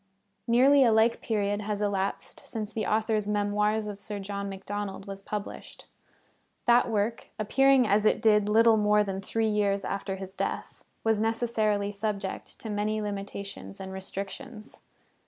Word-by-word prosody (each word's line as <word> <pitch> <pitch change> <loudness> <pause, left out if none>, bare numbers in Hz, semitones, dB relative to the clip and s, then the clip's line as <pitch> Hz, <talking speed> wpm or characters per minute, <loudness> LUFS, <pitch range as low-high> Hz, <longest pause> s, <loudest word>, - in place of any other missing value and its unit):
Nearly 265 +4 +6
a 235 - +5
like 220 +1 +3
period 205 -2 -1
has 210 0 -3
elapsed 200 -1 -2
since 215 -2 -4
the 220 - -2
author's 215 -1 +1
Memoirs 210 +1 +1
of 205 -1 -6
Sir 205 +1 -4
John 200 0 -4
Macdonald 195 0 -5
was 195 0 -7
published. 210 +1 -7 0.8
That 240 0 +5
work, 220 +1 -1
appearing 270 +3 +4
as 205 +1 +3
it 215 - +3
did 210 -2 +4
little 225 +1 +5
more 210 0 +4
than 195 -1 -4
three 225 +2 -1
years 200 -2 +1
after 195 0 -3
his 190 0 -7
death, - - -4 0.2
was 220 -1 +2
necessarily 220 -3 0
subject 200 -1 -4
to 225 - -6
many 210 +1 -1
limitations 200 - -5
and 190 0 -7
restrictions. 195 +3 -6
210 Hz, 150 wpm, -28 LUFS, 200-220 Hz, 0.8 s, Nearly